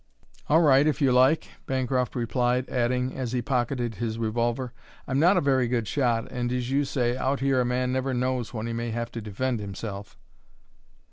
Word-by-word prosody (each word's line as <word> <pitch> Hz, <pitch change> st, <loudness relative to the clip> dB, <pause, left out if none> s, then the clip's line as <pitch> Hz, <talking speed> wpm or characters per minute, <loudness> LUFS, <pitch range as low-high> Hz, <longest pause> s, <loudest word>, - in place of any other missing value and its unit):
"All 160 Hz, +3 st, +5 dB
right, 145 Hz, -2 st, +5 dB
if 155 Hz, -, +1 dB
you 135 Hz, -4 st, +3 dB
like," 130 Hz, +5 st, +4 dB, 0.2 s
Bancroft 130 Hz, -2 st, -1 dB
replied, 125 Hz, +1 st, 0 dB
adding, 125 Hz, +1 st, 0 dB
as 130 Hz, -2 st, -3 dB
he 125 Hz, -1 st, -1 dB
pocketed 120 Hz, -2 st, -1 dB
his 115 Hz, -1 st, -2 dB
revolver, 120 Hz, +2 st, -1 dB, 0.3 s
"I'm 135 Hz, +1 st, 0 dB
not 180 Hz, +5 st, +5 dB
a -, -, +3 dB
very 130 Hz, -3 st, +2 dB
good 115 Hz, -3 st, -1 dB
shot 120 Hz, -5 st, 0 dB
and, 120 Hz, -1 st, -2 dB
as 125 Hz, 0 st, -2 dB
you 140 Hz, +1 st, +2 dB
say, 125 Hz, -3 st, 0 dB
out 135 Hz, +2 st, -1 dB
here 135 Hz, -1 st, +2 dB
a -, -, 0 dB
man 125 Hz, +1 st, 0 dB
never 130 Hz, +1 st, -1 dB
knows 125 Hz, -1 st, -1 dB
when 110 Hz, -2 st, -4 dB
he 115 Hz, -, -3 dB
may 115 Hz, 0 st, -3 dB
have 115 Hz, +1 st, -3 dB
to 115 Hz, -, -5 dB
defend 115 Hz, +4 st, -2 dB
himself." 100 Hz, 0 st, -7 dB
125 Hz, 195 wpm, -26 LUFS, 120-130 Hz, 0.3 s, All